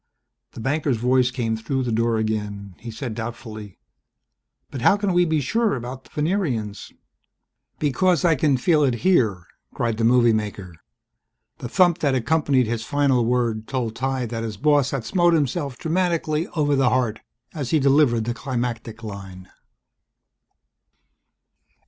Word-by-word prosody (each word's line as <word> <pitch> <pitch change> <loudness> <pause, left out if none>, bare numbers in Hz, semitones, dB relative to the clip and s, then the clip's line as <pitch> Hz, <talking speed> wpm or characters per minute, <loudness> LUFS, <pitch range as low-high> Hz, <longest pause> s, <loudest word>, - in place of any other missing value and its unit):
The - - -9
banker's 140 +1 0
voice 125 +2 +2
came 120 -3 -2
through 130 +4 -2
the 120 - -2
door 115 0 +1
again. 105 -3 -3
He 120 - -8
said 115 +1 -5
doubtfully, 110 -3 -7 0.9
"But 130 - -6
how 200 - +5
can 200 -2 -1
we 175 0 +4
be 160 -2 +1
sure 225 - +1
about 130 +1 -7
the - - -19
Venerians 150 - -2 0.4
..." - - -57
"Because 175 +5 +2
I 165 - +5
can 145 -2 +2
feel 150 +3 +3
it 130 -4 +2
here!" 110 - +2 0.3
cried 115 -2 -1
the 115 - -1
movie 120 0 +4
maker. 105 -4 -4 0.9
The 125 - -6
thump 175 +2 +3
that 140 -3 +1
accompanied 140 0 +2
his 115 0 -3
final 135 -1 +2
word 115 -3 0
told 120 -5 -3
Ty 130 0 -1
that 115 0 -4
his 110 -3 -5
boss 145 0 +3
had 135 -6 -3
smote 175 -2 +3
himself 140 -2 -1
dramatically 165 -2 0
over 145 -2 +2
the 135 -2 +3
heart 120 -4 0 0.3
as 145 -6 -4
he 160 - +3
delivered 135 -4 +3
the 120 +2 -2
climactic 120 -3 -4
line. 95 -3 -9
125 Hz, 155 wpm, -23 LUFS, 115-150 Hz, 0.9 s, how